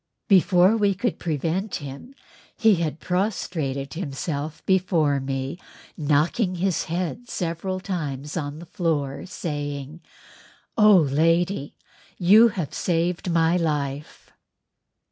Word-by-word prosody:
Before 190 Hz, 0 st, +5 dB
we 205 Hz, -3 st, +2 dB
could 225 Hz, +2 st, -2 dB
prevent 170 Hz, +5 st, -2 dB
him 145 Hz, -, -8 dB, 0.4 s
he 220 Hz, -5 st, +4 dB
had 160 Hz, -2 st, -2 dB
prostrated 165 Hz, -8 st, -2 dB
himself 150 Hz, -2 st, -4 dB
before 170 Hz, -7 st, +2 dB
me 135 Hz, +4 st, -4 dB, 0.4 s
knocking 160 Hz, +7 st, +1 dB
his 180 Hz, 0 st, 0 dB
head 180 Hz, +8 st, -4 dB
several 180 Hz, +2 st, -3 dB
times 150 Hz, -7 st, -4 dB
on 145 Hz, -3 st, -3 dB
the 170 Hz, -, -10 dB
floor, 150 Hz, -5 st, -2 dB
saying, 145 Hz, -2 st, -5 dB, 0.7 s
"Oh, 210 Hz, -2 st, +7 dB
lady, 165 Hz, +1 st, +1 dB, 0.4 s
you 205 Hz, +6 st, +7 dB
have 180 Hz, -10 st, -4 dB
saved 175 Hz, +1 st, -1 dB
my 165 Hz, +1 st, +3 dB
life!" 150 Hz, -3 st, -3 dB
165 Hz, 105 wpm, -24 LUFS, 145-185 Hz, 0.7 s, Oh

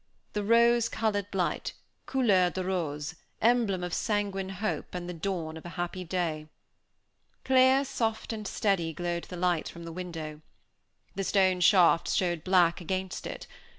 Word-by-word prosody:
The 210 Hz, -, -1 dB
rose 235 Hz, +2 st, +4 dB
colored 205 Hz, -3 st, -1 dB
light, 185 Hz, -3 st, -1 dB, 0.3 s
couleur 205 Hz, -9 st, +3 dB
de 185 Hz, +1 st, -4 dB
rose, 155 Hz, -4 st, -2 dB, 0.3 s
emblem 225 Hz, -6 st, +2 dB
of 180 Hz, -1 st, -4 dB
sanguine 200 Hz, -3 st, -1 dB
hope 195 Hz, 0 st, -3 dB
and 175 Hz, -1 st, -4 dB
the 180 Hz, -, -4 dB
dawn 165 Hz, -2 st, -3 dB
of 160 Hz, -, -11 dB
a 175 Hz, -, -7 dB
happy 175 Hz, +1 st, -3 dB
day. 165 Hz, -3 st, -2 dB, 1.0 s
Clear, 260 Hz, +1 st, +5 dB
soft, 225 Hz, -3 st, -2 dB
and 215 Hz, -2 st, -5 dB
steady, 185 Hz, -7 st, 0 dB
glowed 175 Hz, +1 st, -3 dB
the 180 Hz, -, -8 dB
light 175 Hz, -2 st, 0 dB
from 170 Hz, -, -10 dB
the 165 Hz, -, -6 dB
window. 160 Hz, -3 st, -6 dB, 0.7 s
The 195 Hz, -, -3 dB
stone 190 Hz, -2 st, +3 dB
shafts 175 Hz, -3 st, +5 dB
showed 175 Hz, -4 st, 0 dB
black 180 Hz, -2 st, +3 dB
against 185 Hz, +1 st, -3 dB
it. -, -, -7 dB
185 Hz, 150 wpm, -29 LUFS, 175-205 Hz, 1.0 s, Clear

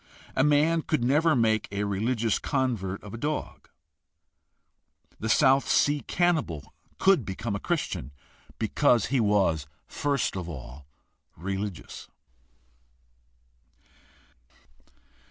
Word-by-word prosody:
A 130 Hz, -, +3 dB
man 150 Hz, +3 st, +3 dB
could 155 Hz, -5 st, -1 dB
never 150 Hz, +5 st, +3 dB
make 110 Hz, -3 st, +2 dB
a 100 Hz, 0 st, -2 dB
religious 110 Hz, +3 st, 0 dB
convert 115 Hz, -9 st, -2 dB
of 105 Hz, -, -10 dB
a 115 Hz, -, -6 dB
dog. 150 Hz, +4 st, -4 dB, 1.5 s
The 110 Hz, -, -3 dB
South 135 Hz, +2 st, +4 dB
Sea 145 Hz, 0 st, +3 dB
cannibal 155 Hz, -, 0 dB, 0.2 s
could 190 Hz, -8 st, +4 dB
become 100 Hz, +2 st, -4 dB
a -, -, -3 dB
Christian 155 Hz, -, -3 dB, 0.5 s
because 120 Hz, -4 st, +2 dB
he 135 Hz, -, +3 dB
was 95 Hz, -9 st, +2 dB, 0.2 s
first 140 Hz, -7 st, -1 dB
of 90 Hz, -2 st, -4 dB
all 65 Hz, -2 st, -9 dB, 0.5 s
religious. 95 Hz, +1 st, -5 dB
115 Hz, 100 wpm, -27 LUFS, 95-145 Hz, 1.5 s, South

